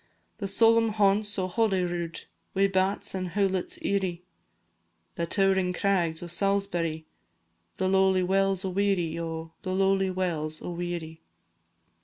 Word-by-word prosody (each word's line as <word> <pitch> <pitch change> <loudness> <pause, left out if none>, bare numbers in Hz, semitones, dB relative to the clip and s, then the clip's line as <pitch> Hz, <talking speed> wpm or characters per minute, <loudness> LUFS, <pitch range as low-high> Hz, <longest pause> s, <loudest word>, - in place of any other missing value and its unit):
The 200 - -2
solemn 225 +3 +4
haunts 205 0 +2
o' 185 -1 0
Holyrood, 180 -4 -1 0.3
Wi' 195 +1 +4
bats 195 +1 +1
and 185 -2 -4
hoolits 190 -2 0
eerie, 185 -3 -1 0.9
The 170 - -3
tow'ring 190 0 +2
crags 175 -4 0
o' - - -6
Salisbury, 175 -4 -1 0.7
The 190 - 0
lowly 190 -1 +3
wells 195 0 +1
o' - - -1
Weary, 180 -4 0
O 165 -1 -5
The 185 -2 -3
lowly 195 0 +2
wells 165 -4 -2
o' - - -6
Weary. 170 -2 -5
185 Hz, 130 wpm, -27 LUFS, 175-195 Hz, 0.9 s, solemn